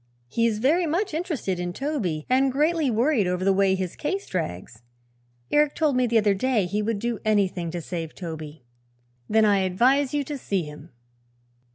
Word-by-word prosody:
"He 230 - +1
is 220 -2 -1
very 315 +10 +2
much 355 +4 -1
interested 305 - -2
in 175 0 -3
Toby 205 - -2
and 265 +1 +3
greatly 305 +2 +1
worried 235 -2 +2
over 180 +1 -1
the 195 - +4
way 190 0 +3
his 185 -2 -4
case 385 +6 -3
drags. 110 - -5 0.7
Eric 295 -1 +3
told 305 -5 +1
me 250 -1 +2
the 230 0 +2
other 210 -2 +3
day 220 0 +1
he 205 +4 -1
would 220 0 -1
do 235 +1 -2
anything 195 -5 +1
to 170 0 -5
save 165 -2 -5
Toby." 160 -5 -7 0.7
"Then 220 0 +4
I 205 -2 +4
advise 250 +9 +2
you 290 -1 0
to 285 0 -6
see 195 -6 -1
him." 150 +1 -10
215 Hz, 185 wpm, -25 LUFS, 180-275 Hz, 0.7 s, the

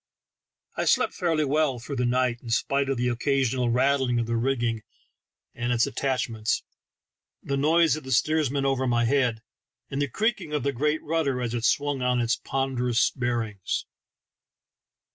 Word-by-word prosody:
I - - -1
slept - - +2
fairly 165 -4 0
well 145 -2 +1
through 135 +4 -6
the 125 0 +1
night 125 -1 +1
in 120 - -9
spite 140 +4 +1
of 135 - 0
the 125 +1 0
occasional 125 0 +1
rattling 130 0 +2
of 120 - 0
the 115 +1 -2
rigging 120 -2 0 0.7
and 120 +1 -2
its 120 -1 +3
attachments, 125 -5 -1 0.8
the 140 - -2
noise 155 +1 +3
of 155 - -7
the 130 - -7
steersman 145 +1 +1
over 135 -1 +1
my 120 -1 +2
head, 120 -3 +1 0.5
and 140 +1 -2
the 145 - +1
creaking 215 - -1
of 150 - -1
the 140 0 0
great 150 +5 0
rudder 150 -5 0
as 120 -2 -2
it 120 -1 -1
swung 145 -1 +1
on 125 0 +1
its 120 0 +1
ponderous 130 -3 0
bearings. 115 -6 -2
130 Hz, 160 wpm, -26 LUFS, 120-140 Hz, 0.8 s, its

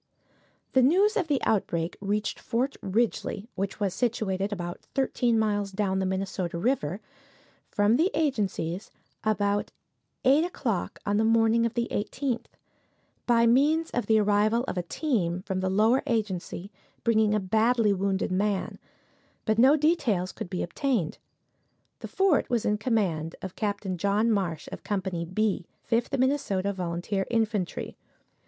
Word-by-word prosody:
The 260 - +5
news 385 - +4
of 380 -7 0
the 285 -3 +1
outbreak 170 -5 0
reached 205 +1 -1
Fort 255 +4 -1
Ridgely 210 0 -1
(which 195 0 -3
was 200 -3 0
situated 205 -4 -1
about 175 -3 -5
thirteen 245 -3 +1
miles 205 -2 0
down 190 -1 0
the 190 - 0
Minnesota 190 -2 -2
river) 195 - -1 0.7
from 210 +3 +3
the 335 +6 +3
agencies 205 - -1 0.3
about 205 -1 +1 0.6
eight 280 +5 +5
o'clock 240 - -2
on 205 0 +1
the 220 - +3
morning 225 +1 +4
of 230 - -8
the 235 -1 0
18th, 245 +4 -2 0.8
by 235 -1 +4
means 295 +7 +3
of 245 - -2
the 220 - +5
arrival 210 +3 +2
of 265 - -4
a 180 - 0
team 180 - -1
from 190 -2 -2
the 185 0 0
Lower 220 +7 +3
Agency, 200 -4 -2 0.3
bringing 220 -2 +3
a - - +2
badly 220 +2 +2
wounded 195 0 -1
man; 200 +1 -1 0.7
but 220 0 +1
no 265 +5 +7
details 275 - +1
could - - -7
be 180 - -2
obtained. 210 - -1 0.8
The - - -6
fort 385 -6 +2
was 240 -3 0
in 210 0 +1
command 190 -9 0
of 190 -1 -6
Capt. 205 -1 -2
John 200 +5 +2
Marsh, 175 -7 -1
of - - -8
Company 185 -4 -2
"B," 195 0 -1 0.2
Fifth 235 +3 0
Minnesota 225 -8 +1
Volunteer 185 +2 -2
Infantry. 220 -5 -1
210 Hz, 145 wpm, -27 LUFS, 190-240 Hz, 0.8 s, no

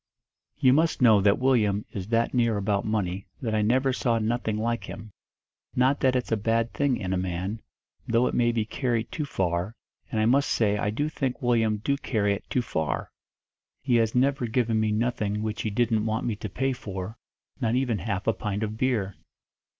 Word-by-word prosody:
"You 130 - +5
must 160 -2 +2
know 110 -4 +6
that 100 +1 +4
Willyum 110 -6 +2
is 95 -2 -5
that 115 +1 +1
near 115 -4 +2
about 100 0 0
money 100 -3 -2
that 115 -4 -2
I 110 - +2
never 130 +5 +2
saw 120 -2 +1
nothing 110 -1 -1
like 115 +1 -1
him; 110 -1 -9 0.6
not 130 +3 +3
that 130 -1 +2
it's 125 -2 -1
a 110 - +3
bad 115 +2 0
thing 140 -3 +1
in 95 -1 -3
a - - +1
man, 95 +4 -3 0.5
though 115 +2 +3
it - - -1
may 120 -1 +3
be 115 -2 -1
carried 120 0 -2
too 150 - -3
far 90 -2 -1 0.4
and 110 - 0
I 110 - +3
must 135 +5 +3
say 105 -3 +2
I 105 0 0
do 145 +8 -1
think 135 -5 -2
Willyum 115 -5 +1
do 140 +2 +1
carry 105 -7 0
it 100 - -7
too 125 - 0
far. 80 -9 -2 0.7
He 125 -3 +3
has 115 0 +1
never 130 -1 +2
given 115 -1 +1
me 110 -1 +1
nothing 105 -2 -1
which 110 0 -3
he 110 - -1
didn't 110 0 +1
want 110 +1 -1
me 115 -3 -1
to 105 - -5
pay 135 +7 -1
for, 100 -3 -6 0.4
not 115 -3 +1
even 125 -5 0
half 95 +3 -3
a 115 - +3
pint 105 +1 -3
of 110 0 -3
beer. 110 -7 0
110 Hz, 205 wpm, -26 LUFS, 105-125 Hz, 0.7 s, know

